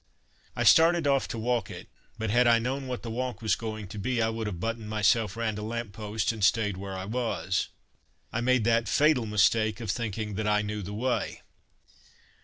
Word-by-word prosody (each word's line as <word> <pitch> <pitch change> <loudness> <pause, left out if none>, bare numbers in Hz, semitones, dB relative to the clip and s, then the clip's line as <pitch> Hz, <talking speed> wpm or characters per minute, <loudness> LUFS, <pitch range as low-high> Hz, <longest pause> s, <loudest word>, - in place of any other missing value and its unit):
I - - 0
started 165 0 +6
off 140 -1 +2
to - - -5
walk 120 +1 -1
it - - -9 0.3
but 110 -2 -2
had 120 +2 +4
I 115 0 +6
known 130 +3 -2
what 125 -1 -5
that 115 - -5
walk 125 +2 -3
was 110 -4 +1
going 110 -3 -6
to 105 - -7
be, 125 +4 -1
I 110 -1 +2
would 115 -1 -3
have 90 -5 -5
buttoned 115 +1 -3
myself 110 0 +2
round 110 -2 -2
a - - -5
lamp 115 -1 -4
post 105 +1 -2
and 110 -3 -6
stayed 105 -1 +3
where 95 0 -6
I 95 - -5
was. 110 -4 -1 0.7
I 120 - -1
made 130 -1 +2
that 115 -1 +2
fatal 135 +1 +3
mistake 110 +2 +2
of 110 -4 -2
thinking 110 -2 -3
that 110 -1 -1
I 105 0 +2
knew 105 0 -4
the 100 +2 -6
way. 125 +3 -2
110 Hz, 210 wpm, -28 LUFS, 105-120 Hz, 0.7 s, started